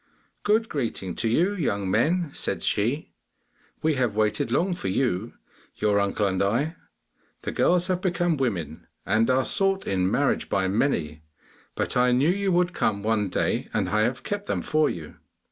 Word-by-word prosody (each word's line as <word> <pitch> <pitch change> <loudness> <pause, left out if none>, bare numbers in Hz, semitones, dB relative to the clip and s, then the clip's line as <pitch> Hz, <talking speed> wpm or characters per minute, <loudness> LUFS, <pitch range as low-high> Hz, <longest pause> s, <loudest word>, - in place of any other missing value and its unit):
'Good 220 +2 +2
greeting 115 - -3
to 115 - +1
you, 175 - +2
young 100 - -1
men!' 160 - +1
said - - -2
she, 120 +9 0 0.7
'we 160 0 +3
have 115 -5 0
waited 105 +1 +1
long 180 +9 +1
for 175 - -5
you, 110 0 -1 0.4
your 105 -1 +2
uncle 100 +1 0
and 95 -1 0
I. 125 - 0 0.7
The - - -3
girls 180 0 +2
have 185 -1 -1
become 175 -2 +1
women, 90 - -3 0.2
and 115 +2 +2
are 130 +1 +3
sought, 195 -1 +2
in 95 -1 +1
marriage - - 0
by 95 -1 +1
many, 85 - 0 0.5
but - - -1
I 125 0 +4
knew 140 +7 +3
you 200 0 0
would 180 0 +2
come 100 -1 0
one 105 -2 +1
day, - - -1
and - - 0
I 105 +1 +2
have 120 +3 -1
kept 205 0 -4
them - - -1
for 155 -1 +2
you. 80 -3 -7
125 Hz, 175 wpm, -25 LUFS, -, 0.7 s, I